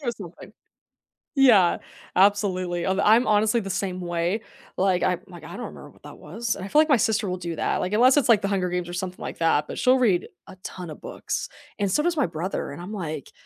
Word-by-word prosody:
You're 240 -2 -1
so 180 -6 -10
funny. - - -12 0.9
Yeah, 210 -10 +6 0.4
absolutely, 185 -3 +2
I'm 190 +1 0
I'm 220 +3 +4
honestly 215 +2 +3
the 195 - -6
same 185 -1 -3
way. 175 +4 -1 0.4
Like 185 -1 +2
I 180 -1 +1
like 175 -3 -12
I 160 - -10
don't 240 -3 -5
remember 145 - -12
what - - -24
that 145 - -11
was 225 +9 -4
I 190 +1 -7
feel 300 +8 +4
like 315 - 0
my 275 - +5
sister 220 -2 0
will 180 - -2
do 170 -2 -5
that. - - 0
Like, 185 - -3
unless 255 +6 +5
it's, 270 - +3
like, 220 -3 +6
The 200 - -1
Hunger 185 -3 0
Games 180 -1 -3
or - - -7
something 180 0 -5
like - - -6
that, 160 -3 +2
but - - -7
she'll 255 +1 +4
read 200 -8 +2 0.2
a - - -11
ton 180 -3 -7
of 155 - -9
books - - -4 0.3
and 200 -2 0
so 300 - +2
does 340 -1 0
my 285 - +3
brother, 170 +1 -4
and 145 +5 -8
I'm, 185 +4 -8
like, 155 -8 -5
190 Hz, 240 wpm, -24 LUFS, 175-220 Hz, 0.9 s, Yeah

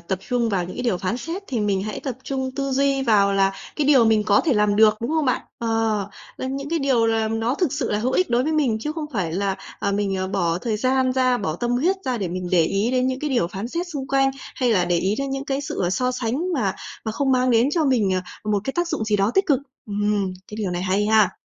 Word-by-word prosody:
tập 190 +2 -3
trung 240 -2 +1
vào 190 -4 0
những 180 - -8
cái 250 - -3
điều 230 -8 0
phán 195 +6 -2
xét 330 +10 -5
thì 240 -5 -2
mình 200 -2 0
hãy 215 0 -5
tập 260 -3 -4
trung 265 -1 -2
tư 275 -1 -1
duy 275 0 +2
vào 205 -5 +3
là 195 0 +3 0.2
cái 295 -2 +1
điều 265 -5 +6
mình 220 -1 +3
có 205 -1 +4
thể 300 - +3
làm 210 -1 +2
được, 215 0 +6
đúng 235 +5 -2
hông 315 -2 +1
bạn? 255 - +1 0.2
Ờ, 225 -3 0 0.3
làm 260 +1 -3
những 275 +1 -5
cái 335 - +1
điều 260 -5 +2
là 225 -1 +1
nó 225 +3 0
thực 340 -4 0
sự 280 -4 -2
là 210 - +1
hữu 250 +4 -1
ích 370 -6 +1
đối 240 +1 +3
với 315 +3 -1
mình, 260 -8 +1
chứ 300 +4 -3
không 310 -2 -4
phải 180 -7 -1
là, 195 +1 -1 0.2
à, 200 - 0
mình, 200 -1 0
ờ, 185 0 -2
bỏ 175 -3 0
thời 220 +1 -2
gian 255 +2 +1
ra, 255 -1 +2
bỏ 160 -6 -2
tâm 240 +4 -2
huyết 330 +11 +2
ra 250 -3 -1
để 190 -4 -2
mình 180 0 -4
để 175 -3 +4
ý 200 +7 0
đến 255 0 +1
những 260 0 -2
cái 300 -1 -2
điều 240 -10 +2
phán 200 +6 -5
xét 345 +5 -3
xung 280 -5 -5
quanh, 270 0 +3 0.2
hay 250 -3 +1
là 180 -4 +3
để 175 0 +1
ý 195 +4 0
đến 275 0 -2
những 270 0 -3
cái 275 0 -1
sự, 280 - -5
ờ, 175 - +1
so 255 +4 0
sánh 260 +9 -2
mà 205 -9 0 0.3
mà 220 - -2
không 270 +1 +1
mang 255 0 +3
đến 235 +3 +4
cho 320 -1 +1
mình, 235 -8 +2 0.3
ờ, 210 - -2
một 205 -1 +2
cái 270 - -2
tác 345 0 -1
dụng 220 - -2
gì 210 -1 +1
đó 200 +2 +2
tích 390 0 +3
cực. 280 -5 +3 0.3
Ừm, 205 -2 0 0.2
cái 210 - -8
điều 205 -4 -2
này 175 0 -2
hay 195 +3 +1
ha. 215 -3 +4
230 Hz, 285 wpm, -23 LUFS, 200-270 Hz, 0.3 s, điều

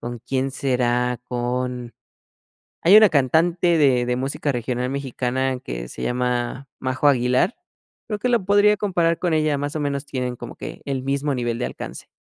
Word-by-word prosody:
¿con 120 0 -5
quién 130 +2 -1
será?, 125 -2 0
con 125 0 -3 0.9
hay 190 +5 +8
una 215 -1 +7
cantante 165 +5 +2
de 130 -5 +3
de 125 - +1
música 135 +3 -2
regional 125 0 -2
mexicana 130 -1 -2
que - - -6
se - - -8
llama 125 +1 -1
Majo 130 +2 0
Aguilar, 125 - +2 0.5
creo 210 - -2
que 250 - 0
lo 235 -5 +2
podría 205 +1 +5
comparar 170 -5 +1
con 175 -2 0
ella, 155 -2 +1
más 145 +2 -3
o - - -1
menos 140 0 -2
tienen 125 -3 -3
como - - -8
que - - -8
el 135 -2 -2
mismo 140 +1 -1
nivel 120 -1 -2
de 125 - -1
alcance. - - -7
130 Hz, 170 wpm, -22 LUFS, 125-155 Hz, 0.9 s, hay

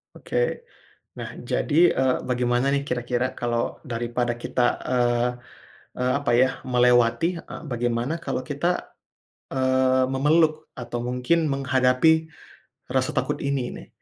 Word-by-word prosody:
Oke 485 0 -2 0.6
nah - - -6
jadi, 170 +3 +2
eee, 130 -1 +3
bagaimana 125 +1 +1
nih 140 0 0
kira-kira 125 +1 -1
kalau 120 -1 -2
daripada 120 -2 -2
kita, 120 +1 -1 0.2
eee 120 -1 +2 0.7
eee, 125 0 +1
apa 145 -3 -2
ya, 130 +2 +5 0.2
melewati, 125 +4 +3
eee, - - -9
bagaimana 120 +3 -1
kalau - - -2
kita, 165 +5 -2 0.6
eee, 130 0 +2
memeluk 155 +3 +2
atau 120 -1 -5
mungkin 125 +7 +1
menghadapi 135 +4 +2 0.6
rasa - - 0
takut - - 0
ini 140 -3 -1
nih. - - -12
130 Hz, 120 wpm, -24 LUFS, 120-140 Hz, 0.7 s, ya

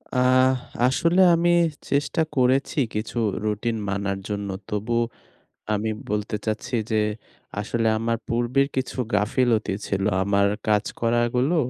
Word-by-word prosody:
আহ 130 +1 +4 0.3
আসলে 170 +7 +3
আমি 170 +1 +2 0.4
চেষ্টা 145 +3 +1
করেছি 130 +3 +2 0.2
কিছু 110 +3 -3 0.3
রুটিন 110 +2 -1
মানার 100 0 -2
জন্য। 100 -1 -3 0.2
তবু 110 +2 -2 0.8
আমি 105 +1 -1 0.2
বলতে 105 +1 -1
চাচ্ছি 110 +3 -2 0.2
যে 110 -1 +3 0.6
আসলে 115 +2 -1
আমার 115 +1 0
পূর্বের 120 +4 +1
কিছু 130 0 -2 0.2
গাফিলতি 110 +1 +1
ছিল। 95 -1 -1 0.2
আমার 100 0 +3 0.2
কাজ 105 -1 +3 0.2
করা 115 0 +2 0.2
গুলো, 135 +8 +2
115 Hz, 125 wpm, -24 LUFS, 105-130 Hz, 0.8 s, আহ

